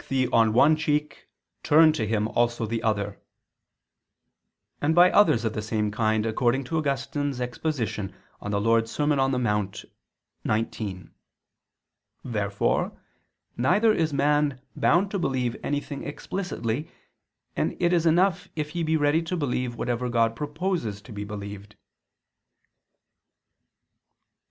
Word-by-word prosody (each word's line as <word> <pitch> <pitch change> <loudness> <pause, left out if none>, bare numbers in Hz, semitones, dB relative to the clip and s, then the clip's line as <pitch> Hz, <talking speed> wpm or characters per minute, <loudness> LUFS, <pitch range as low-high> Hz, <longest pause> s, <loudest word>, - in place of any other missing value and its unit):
'thy 130 -1 +2
right'] 115 +7 +5
cheek, 150 -1 -1 0.3
turn 155 +1 +6
to 110 -9 -2
him 110 0 0
also 120 -1 0
the 115 +1 -3
other"; 105 -3 -1 1.6
and 155 +2 +2
by 175 +1 +7
others 120 - +4
of 110 - -1
the 105 - -3
same 105 -1 -1
kind, 110 0 +1
according 120 +4 +1
to 160 - -4
Augustine's 140 -2 -1
exposition 125 -5 -2 0.3
(De 105 - -5
Serm. 115 +7 +1
Dom. 135 -1 +1
in 125 - -1
Monte 105 -3 -2 0.8
xix). 95 -5 -6 1.1
Therefore 105 -4 -1 0.6
neither 205 - +3
is 160 -5 0
man 145 -1 +1 0.2
bound 185 +4 +2
to 200 - -1
believe 125 -6 -1
anything 145 0 -3
explicitly, 150 - -4 0.7
and - - -1
it 175 -1 +2
is 170 -1 +2
enough 175 +2 +2
if 150 -1 -3
he 170 - -3
be 160 0 +1
ready 145 +2 +2
to 170 +2 -3
believe 125 -5 -2
whatever 125 +1 -2
God 115 -1 +2
proposes 150 - -2
to 125 - -13
be 105 -1 -5
believed. 100 0 -8
Obj. - - -36
125 Hz, 125 wpm, -26 LUFS, 110-155 Hz, 1.6 s, by